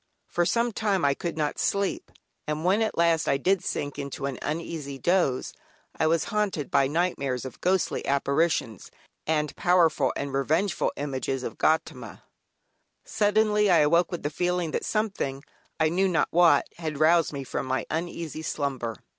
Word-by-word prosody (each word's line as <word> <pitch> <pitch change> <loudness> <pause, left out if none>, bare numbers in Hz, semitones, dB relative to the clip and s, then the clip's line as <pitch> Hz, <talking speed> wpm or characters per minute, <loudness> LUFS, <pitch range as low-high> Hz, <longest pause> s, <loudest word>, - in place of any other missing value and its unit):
For 175 -1 0
some 235 +5 +1
time 200 -7 0
I 140 - +4
could 170 +3 -5
not 150 -2 -1
sleep, 200 -1 -1 0.4
and 150 +2 -2
when 195 +4 +3
at 220 - -1
last 165 -1 +2
I 135 - +3
did 185 +6 +1
sink 145 0 -3
into 140 0 -5
an 135 -2 -4
uneasy 150 -3 -4
doze 170 -5 +1 0.4
I 160 - +1
was 165 0 +2
haunted 205 -9 -1
by 140 -1 +4
nightmares 140 -6 -1
of 130 - -9
ghostly 185 -1 +1
apparitions, 140 - 0 0.4
and 150 -1 0
powerful 165 -6 +3
and 140 -1 -4
revengeful 155 +8 +1
images 135 -2 -3
of - - -6
Gaudama. 160 +1 -1 0.8
Suddenly 210 0 +2
I 175 - +6
awoke 165 +3 +3
with 175 - -5
the 145 - -2
feeling 175 0 -1
that - - -2
something, 195 -11 -2 0.4
I 160 0 +3
knew 190 +4 +2
not 175 -3 +1
what, 170 -4 +5
had 155 -4 -4
roused 165 +1 +4
me 140 -2 -5
from 130 - -4
my 130 0 -1
uneasy 165 -1 -4
slumber. 130 -7 -3
160 Hz, 165 wpm, -26 LUFS, 140-180 Hz, 0.8 s, I